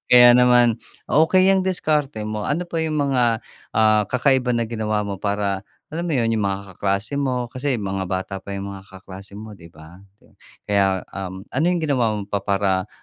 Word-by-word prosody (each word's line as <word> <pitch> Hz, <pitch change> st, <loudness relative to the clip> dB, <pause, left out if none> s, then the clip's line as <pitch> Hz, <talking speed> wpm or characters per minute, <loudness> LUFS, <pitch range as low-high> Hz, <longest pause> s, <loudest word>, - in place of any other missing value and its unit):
Kaya 120 Hz, 0 st, +9 dB
naman 120 Hz, -2 st, +4 dB, 0.3 s
okey, 165 Hz, +5 st, +4 dB
'yang 195 Hz, 0 st, +4 dB
diskarte 150 Hz, -, -1 dB
mo, 105 Hz, -1 st, -4 dB
ano 165 Hz, +5 st, -1 dB
pa 170 Hz, -1 st, -3 dB
'yung 160 Hz, -1 st, -1 dB
mga, 125 Hz, -5 st, +1 dB, 0.3 s
ah, 110 Hz, -1 st, +4 dB
kakaiba 125 Hz, -1 st, +2 dB
na 115 Hz, -, 0 dB
ginawa 110 Hz, -2 st, -2 dB
mo 100 Hz, -2 st, -5 dB
para, 100 Hz, -1 st, -1 dB, 0.3 s
alam 170 Hz, +2 st, -3 dB
mo 155 Hz, -, 0 dB
'yun 115 Hz, -2 st, +1 dB
'yung 110 Hz, -, 0 dB
mga 100 Hz, -1 st, -3 dB
kaklase 100 Hz, +9 st, -2 dB
mo, 125 Hz, -3 st, -2 dB
kasi 130 Hz, 0 st, -1 dB
mga 95 Hz, -3 st, -3 dB
bata 95 Hz, +1 st, -3 dB
pa 100 Hz, +1 st, -7 dB
'yung 100 Hz, -, -5 dB
mga 95 Hz, -1 st, -10 dB
kaklase 95 Hz, +1 st, -12 dB
mo 110 Hz, +1 st, -9 dB
'di 85 Hz, -5 st, -14 dB
ba? 80 Hz, +3 st, -15 dB, 0.6 s
Kaya 95 Hz, -2 st, +1 dB
um, 95 Hz, -1 st, -6 dB
ano 145 Hz, +5 st, 0 dB
'yung 175 Hz, -2 st, 0 dB
ginawa 125 Hz, -7 st, +1 dB
mo 105 Hz, -, -4 dB
pa 100 Hz, 0 st, -3 dB
para, 95 Hz, -2 st, 0 dB
110 Hz, 190 wpm, -22 LUFS, 100-130 Hz, 0.6 s, Kaya